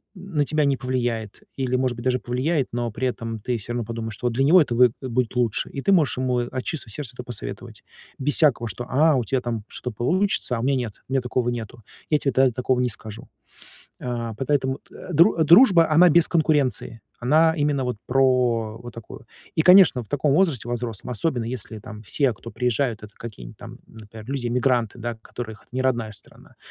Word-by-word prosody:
м, 185 Hz, -3 st, -9 dB
на 145 Hz, -, +3 dB
тебя 150 Hz, +1 st, +1 dB
не 140 Hz, -1 st, +2 dB
повлияет 120 Hz, -5 st, -3 dB
или, 130 Hz, -2 st, -1 dB
может 125 Hz, -1 st, 0 dB
быть, 120 Hz, -, -8 dB
даже 130 Hz, 0 st, +1 dB
повлияет, 130 Hz, +5 st, -1 dB
но 120 Hz, -1 st, -2 dB
при 125 Hz, +5 st, -2 dB
этом 115 Hz, -2 st, -4 dB
ты 120 Hz, +3 st, -2 dB
всё 115 Hz, +2 st, -5 dB
равно 120 Hz, -2 st, -2 dB
подумаешь, 115 Hz, -1 st, -5 dB
что 125 Hz, -, -3 dB
вот 120 Hz, -, -1 dB
для 130 Hz, +4 st, +1 dB
него 170 Hz, +6 st, +6 dB
это 125 Hz, -6 st, -1 dB
вэ 125 Hz, +1 st, +6 dB
будет 130 Hz, -2 st, -5 dB
будет 125 Hz, -1 st, 0 dB
лучше, 120 Hz, -3 st, 0 dB
и 135 Hz, -, -6 dB
ты 195 Hz, -, +1 dB
можешь 165 Hz, -10 st, +3 dB
ему 125 Hz, -1 st, 0 dB
от 125 Hz, +1 st, -4 dB
чистого 155 Hz, -9 st, -5 dB
сердца 130 Hz, +2 st, -6 dB
это 125 Hz, -, -7 dB
посоветовать. 120 Hz, -3 st, -6 dB, 0.4 s
Без 145 Hz, +2 st, 0 dB
всякого, 135 Hz, -7 st, +3 dB
что 110 Hz, +4 st, -5 dB
а, 150 Hz, +3 st, +4 dB
у 125 Hz, -, +1 dB
тебя 130 Hz, +2 st, -1 dB
там 115 Hz, -3 st, -4 dB
что-то 125 Hz, -, -6 dB
получится, 170 Hz, -, 0 dB
а -, -, -3 dB
у -, -, -3 dB
меня 135 Hz, +2 st, +2 dB
нет, 120 Hz, -5 st, -5 dB
у 130 Hz, -, -6 dB
меня 135 Hz, -, +2 dB
такого 125 Hz, 0 st, -1 dB
нету, 115 Hz, -1 st, -6 dB, 0.3 s
я 150 Hz, -, +4 dB
тебе 140 Hz, -2 st, 0 dB
та 130 Hz, -1 st, +4 dB
такого 125 Hz, +1 st, 0 dB
не 125 Hz, 0 st, +1 dB
скажу. 110 Hz, +1 st, -7 dB, 0.7 s
А 120 Hz, -2 st, -4 dB
по 120 Hz, +5 st, -5 dB
поэтому 130 Hz, -1 st, 0 dB
т -, -, -21 dB
э, 180 Hz, -, -8 dB
дру 165 Hz, +1 st, +5 dB
дружба, 170 Hz, -, +6 dB
она 175 Hz, +3 st, +6 dB
без 170 Hz, +1 st, +5 dB
конкуренции, 150 Hz, -8 st, 0 dB, 0.2 s
она 155 Hz, +6 st, +4 dB
именно 145 Hz, -3 st, 0 dB
вот 125 Hz, -3 st, -3 dB
про 125 Hz, -4 st, +2 dB
вот 120 Hz, +1 st, -10 dB
такую. 115 Hz, -2 st, -11 dB, 0.3 s
И, -, -, +3 dB
конечно, 180 Hz, -8 st, +6 dB
в -, -, -20 dB
таком 145 Hz, 0 st, +1 dB
возрасте, 150 Hz, -, +1 dB
во 120 Hz, -, -2 dB
взрослом, 120 Hz, -1 st, -6 dB
особенно 125 Hz, -1 st, -1 dB
если 115 Hz, -2 st, -5 dB
там 105 Hz, +1 st, -10 dB
все, 130 Hz, +4 st, +1 dB
кто 115 Hz, +2 st, -11 dB
приезжают, 125 Hz, -2 st, -1 dB
это 105 Hz, -1 st, -11 dB
какие-нибудь 85 Hz, -, -10 dB
там, -, -, -11 dB
например, 110 Hz, 0 st, -12 dB
люди-иммигранты, 125 Hz, -3 st, 0 dB
да 120 Hz, +1 st, -4 dB
которых 110 Hz, -1 st, -8 dB
это -, -, -32 dB
не 130 Hz, +1 st, -2 dB
родная 120 Hz, -4 st, 0 dB
страна. 100 Hz, -1 st, -12 dB
125 Hz, 220 wpm, -23 LUFS, 115-140 Hz, 0.7 s, него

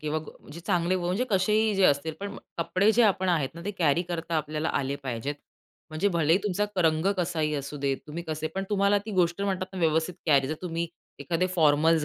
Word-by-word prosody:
किंवा 155 Hz, 0 st, -1 dB
गो 155 Hz, -, -10 dB, 0.2 s
अ, -, -, -13 dB
जे 170 Hz, -, -8 dB
चांगले 180 Hz, 0 st, +1 dB
म्हणजे 180 Hz, +7 st, 0 dB
कसेही 210 Hz, +3 st, +2 dB
जे 195 Hz, -1 st, +3 dB
असतील. 150 Hz, +1 st, +2 dB
पण 200 Hz, 0 st, -5 dB, 0.2 s
कपडे 185 Hz, +5 st, +2 dB
जे 240 Hz, +3 st, +4 dB
आपण 190 Hz, -3 st, +2 dB
आहेत 155 Hz, -7 st, +2 dB
ना, 170 Hz, -, -9 dB
ते 205 Hz, -, -1 dB
कॅरी 165 Hz, -1 st, +3 dB
करता 170 Hz, -1 st, -2 dB
आपल्याला 155 Hz, +1 st, -2 dB
आले 140 Hz, 0 st, -2 dB
पाहिजेत. 130 Hz, +2 st, -3 dB, 0.6 s
म्हणजे 155 Hz, +6 st, +1 dB
भलेही 170 Hz, -1 st, +3 dB
तुमचा 205 Hz, +1 st, 0 dB
क -, -, -1 dB
रंग 160 Hz, +2 st, +2 dB
कसाही 165 Hz, -4 st, 0 dB
असू 140 Hz, +1 st, -4 dB
देत. 140 Hz, -1 st, 0 dB
तुम्ही 160 Hz, +3 st, -5 dB
कसे 155 Hz, 0 st, -2 dB
पण 195 Hz, 0 st, -2 dB
तुम्हाला 200 Hz, 0 st, +3 dB
ती -, -, -4 dB
गोष्ट 180 Hz, 0 st, +1 dB
म्हणतात 190 Hz, -2 st, -1 dB
ना, 190 Hz, -, -6 dB
व्यवस्थित 160 Hz, +1 st, +1 dB
कॅरी 140 Hz, -3 st, +4 dB
जर 155 Hz, -, -1 dB
तुम्ही 170 Hz, -1 st, -2 dB, 0.3 s
एखादे 175 Hz, +1 st, 0 dB
फॉर्मल्स 155 Hz, 0 st, +4 dB
170 Hz, 215 wpm, -27 LUFS, 155-185 Hz, 0.6 s, जे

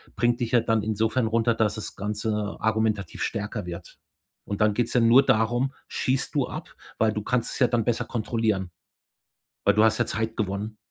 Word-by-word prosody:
bringt 120 Hz, 0 st, +1 dB
dich 120 Hz, 0 st, -2 dB
ja 120 Hz, -, +6 dB
dann 110 Hz, -1 st, +1 dB
insofern 110 Hz, +3 st, 0 dB
runter, 115 Hz, +1 st, +2 dB
dass 105 Hz, -2 st, +1 dB
das 110 Hz, -, -6 dB
Ganze 105 Hz, +1 st, -2 dB
argumentativ 110 Hz, -2 st, 0 dB
stärker 105 Hz, -2 st, -3 dB
wird. 85 Hz, 0 st, -9 dB, 0.5 s
Und 100 Hz, -, -4 dB
dann 105 Hz, -1 st, +4 dB
geht's 120 Hz, +1 st, -1 dB
ja 125 Hz, -, +4 dB
nur 120 Hz, +4 st, +6 dB
darum, 120 Hz, +5 st, +2 dB
schießt 130 Hz, +3 st, -1 dB
du 135 Hz, -3 st, +2 dB
ab? -, -, -8 dB, 0.2 s
Weil 110 Hz, -1 st, +2 dB
du 105 Hz, -, -3 dB
kannst 125 Hz, 0 st, 0 dB
es -, -, -5 dB
ja 125 Hz, -, +5 dB
dann 115 Hz, -3 st, 0 dB
besser 120 Hz, 0 st, +1 dB
kontrollieren, 110 Hz, -5 st, -1 dB, 0.9 s
weil -, -, +4 dB
du 105 Hz, -, +5 dB
hast 110 Hz, -1 st, +3 dB
ja -, -, +1 dB
Zeit 110 Hz, 0 st, -2 dB
gewonnen. 105 Hz, +1 st, -3 dB
110 Hz, 195 wpm, -25 LUFS, 105-120 Hz, 0.9 s, ja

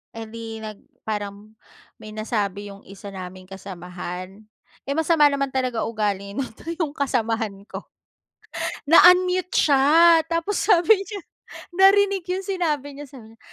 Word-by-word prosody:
eh, 225 Hz, -, -6 dB
di 225 Hz, 0 st, -8 dB
nag 215 Hz, -2 st, -8 dB, 0.3 s
parang 210 Hz, 0 st, -6 dB, 0.4 s
may 215 Hz, -, -10 dB
nasabi 205 Hz, -2 st, -3 dB
yung 200 Hz, -, -13 dB
isa 200 Hz, +1 st, -10 dB
naming 185 Hz, 0 st, -9 dB
kasamahan. 185 Hz, +1 st, -8 dB, 0.4 s
Eh, 280 Hz, -, -1 dB
masama 320 Hz, -2 st, +4 dB
naman 275 Hz, 0 st, -1 dB
talaga 255 Hz, -3 st, -1 dB
ugali 205 Hz, -3 st, -3 dB
nito 260 Hz, +2 st, -6 dB
yung 310 Hz, -4 st, -1 dB
kasamahan 230 Hz, -6 st, -1 dB, 0.2 s
ko, -, -, -8 dB, 1.0 s
na-unmute 360 Hz, +2 st, +5 dB
siya 320 Hz, +4 st, +5 dB
tapos 335 Hz, +4 st, -1 dB
sabi 410 Hz, +2 st, +4 dB
niya, 405 Hz, 0 st, -7 dB, 0.6 s
narinig 390 Hz, -1 st, +4 dB
yung 375 Hz, +1 st, -2 dB
sinabi 300 Hz, -7 st, -2 dB
niya, 290 Hz, -, -8 dB
sabi 225 Hz, -5 st, -14 dB
niya, -, -, -28 dB
235 Hz, 135 wpm, -23 LUFS, 205-335 Hz, 1.0 s, na-unmute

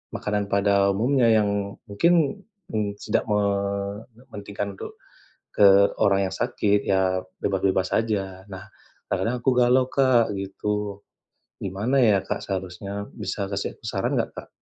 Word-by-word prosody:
makanan 105 Hz, -1 st, -2 dB
pada 100 Hz, 0 st, +3 dB
umumnya 120 Hz, +4 st, +2 dB
yang 100 Hz, -2 st, +1 dB
mungkin, 165 Hz, -, +2 dB, 0.3 s
mmm, 105 Hz, -2 st, -2 dB
tidak -, -, 0 dB
mementingkan 100 Hz, +1 st, -3 dB
untuk -, -, -8 dB, 0.6 s
ke 100 Hz, 0 st, +6 dB
orang 100 Hz, -1 st, +3 dB
yang -, -, -6 dB
sakit, 105 Hz, -4 st, +1 dB
ya 95 Hz, -1 st, +2 dB, 0.2 s
bebas-bebas 95 Hz, -1 st, +1 dB
saja. 95 Hz, -4 st, -2 dB
Nah, 95 Hz, 0 st, -8 dB, 0.4 s
kadang-kadang 115 Hz, +7 st, -1 dB
aku 130 Hz, -, +3 dB
galau 125 Hz, +1 st, +4 dB
Kak, 130 Hz, -5 st, +3 dB
gitu. 100 Hz, +1 st, -4 dB, 0.6 s
Gimana 105 Hz, +8 st, -1 dB
ya 105 Hz, -4 st, +4 dB
Kak -, -, -3 dB
seharusnya? 100 Hz, +1 st, -5 dB
Bisa 100 Hz, -1 st, -4 dB
kasih 100 Hz, -, -3 dB
aku -, -, -26 dB
saran -, -, -1 dB
nggak -, -, -1 dB
Kak? -, -, -8 dB
100 Hz, 130 wpm, -24 LUFS, 100-110 Hz, 0.6 s, ke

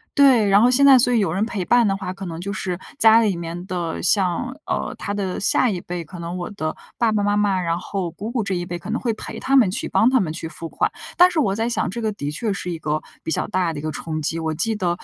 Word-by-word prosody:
对， 260 Hz, -7 st, +5 dB
然 200 Hz, +1 st, +5 dB
后 240 Hz, -, +5 dB
现 265 Hz, +3 st, +5 dB
在 270 Hz, -2 st, +8 dB
所 245 Hz, +1 st, +3 dB
以 240 Hz, -, +3 dB
有 195 Hz, -7 st, +1 dB
人 195 Hz, +3 st, 0 dB
陪 210 Hz, -5 st, -3 dB
伴 240 Hz, +4 st, +4 dB
的 195 Hz, -1 st, 0 dB
话， 185 Hz, -2 st, -5 dB
可 195 Hz, 0 st, -7 dB
能 165 Hz, -1 st, -6 dB
就 200 Hz, +3 st, -4 dB
是 180 Hz, -3 st, -3 dB, 0.2 s
家 225 Hz, 0 st, +7 dB
里 210 Hz, -5 st, +1 dB
面 170 Hz, +1 st, -6 dB
的， 175 Hz, -3 st, -4 dB
像 195 Hz, +7 st, +2 dB
呃， -, -, -2 dB
他 -, -, -4 dB
的 195 Hz, -3 st, -3 dB
下 225 Hz, +4 st, +3 dB
一 180 Hz, -3 st, -4 dB
辈， 175 Hz, -1 st, -5 dB
可 175 Hz, +3 st, -11 dB
能 170 Hz, +1 st, -5 dB
我 175 Hz, +3 st, -5 dB
的 155 Hz, -6 st, -4 dB, 0.2 s
爸 230 Hz, -1 st, +3 dB
爸 210 Hz, -1 st, 0 dB
妈 205 Hz, 0 st, +1 dB
妈， 205 Hz, -2 st, +1 dB
然 170 Hz, -1 st, -1 dB
后 185 Hz, -1 st, -4 dB
姑 205 Hz, +6 st, -7 dB
姑 235 Hz, -2 st, -1 dB
这 200 Hz, -1 st, -2 dB
一 175 Hz, -1 st, -2 dB
辈， 175 Hz, 0 st, -5 dB
可 210 Hz, -, -7 dB
能 235 Hz, -, -2 dB
会 240 Hz, -, 0 dB
陪 -, -, -7 dB
他 270 Hz, -, +1 dB
们 230 Hz, -9 st, +5 dB
去、 205 Hz, -, -3 dB
帮 225 Hz, -, +3 dB
他 260 Hz, -, +4 dB
们 175 Hz, -7 st, -1 dB
去 165 Hz, +1 st, -5 dB
付 165 Hz, 0 st, -8 dB
款。 -, -, -1 dB, 0.3 s
但 360 Hz, +1 st, +7 dB
是 335 Hz, -, 0 dB
我 200 Hz, -9 st, +1 dB
在 225 Hz, +2 st, -1 dB
想， 230 Hz, -5 st, 0 dB
这 200 Hz, -, -5 dB
个 220 Hz, -2 st, -1 dB
的 145 Hz, -8 st, -5 dB
确 200 Hz, +8 st, -2 dB
是 190 Hz, -2 st, -5 dB
一 170 Hz, -, -3 dB
个 155 Hz, -1 st, -2 dB, 0.2 s
比 -, -, -4 dB
较 -, -, 0 dB
大 185 Hz, -5 st, 0 dB
的 145 Hz, -, -5 dB
一 -, -, -6 dB
个 155 Hz, +1 st, -3 dB
冲 155 Hz, 0 st, -4 dB
击， 160 Hz, +2 st, -1 dB
我 160 Hz, -1 st, -2 dB
记 220 Hz, +8 st, +1 dB
得 180 Hz, -4 st, -1 dB
195 Hz, 315 characters per minute, -21 LUFS, 170-220 Hz, 0.3 s, 在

